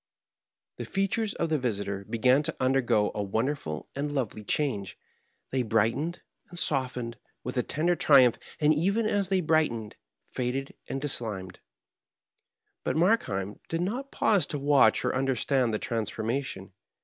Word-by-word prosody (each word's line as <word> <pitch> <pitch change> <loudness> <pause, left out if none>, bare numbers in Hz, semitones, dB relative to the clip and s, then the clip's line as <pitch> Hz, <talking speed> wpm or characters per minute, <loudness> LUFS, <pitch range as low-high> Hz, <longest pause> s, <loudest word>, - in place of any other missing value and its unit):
The - - -5
features 200 +2 -1
of 165 - -1
the 155 -2 +1
visitor 100 -5 -2
began 125 +4 +4
to - - -3
undergo 130 -5 +2
a 105 - -2
won 105 +4 0
derful 105 - -4
and 145 +1 -2
lovely 125 -6 -2
change: 105 -5 -1 0.5
they 130 - +1
brightened 115 +9 0 0.3
and 175 - -11
softened 125 -6 -1 0.3
with 125 - -5
a 125 - +2
tender 165 +7 +1
triumph, 135 -8 +5 0.2
and 150 0 +4
even 200 +9 +1
as 200 -3 +1
they 190 -1 +2
brightened, 150 -10 0 0.3
faded 130 +2 -2 0.2
and 135 - -2
dislimned. 110 -10 -3 1.2
But - - -1
Markheim 105 - +1
did 165 +1 -1
not 245 +10 -2
pause 205 -4 +2
to 150 - -3
watch 140 -5 +4
or - - +1
understand 130 -1 +1
the 105 - 0
transformation. 110 -2 -3
130 Hz, 145 wpm, -28 LUFS, 110-155 Hz, 1.2 s, triumph